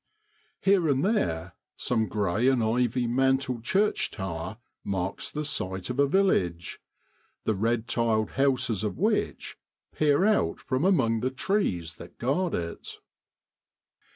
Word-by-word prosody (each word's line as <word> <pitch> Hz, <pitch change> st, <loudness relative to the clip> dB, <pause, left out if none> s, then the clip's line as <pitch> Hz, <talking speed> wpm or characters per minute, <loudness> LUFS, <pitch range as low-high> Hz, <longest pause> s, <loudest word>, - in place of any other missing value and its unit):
Here 190 Hz, -5 st, +3 dB
and 140 Hz, +2 st, +2 dB
there 85 Hz, -, 0 dB, 0.2 s
some 110 Hz, -3 st, 0 dB
grey 105 Hz, +3 st, 0 dB
and 130 Hz, -3 st, +3 dB
ivy 120 Hz, +2 st, +1 dB
mantled 130 Hz, 0 st, +1 dB
church 200 Hz, -, +1 dB
tower 95 Hz, +2 st, -5 dB, 0.3 s
marks 95 Hz, 0 st, -2 dB
the 150 Hz, 0 st, -4 dB
site 95 Hz, -7 st, -1 dB
of 125 Hz, -, -5 dB
a 140 Hz, -, +5 dB
village, 95 Hz, -, +1 dB, 0.6 s
the 110 Hz, -, +1 dB
red 115 Hz, +3 st, 0 dB
tiled 115 Hz, -2 st, +1 dB
houses 130 Hz, -6 st, +1 dB
of 105 Hz, -4 st, -2 dB
which -, -, -1 dB, 0.3 s
peer 150 Hz, +4 st, +3 dB
out 210 Hz, -, +2 dB
from 130 Hz, +5 st, -1 dB
among 130 Hz, -, +3 dB
the 130 Hz, -, 0 dB
trees 130 Hz, -, -1 dB
that -, -, -12 dB
guard 160 Hz, +9 st, 0 dB
it. 85 Hz, -1 st, -5 dB
120 Hz, 130 wpm, -27 LUFS, 100-140 Hz, 0.6 s, a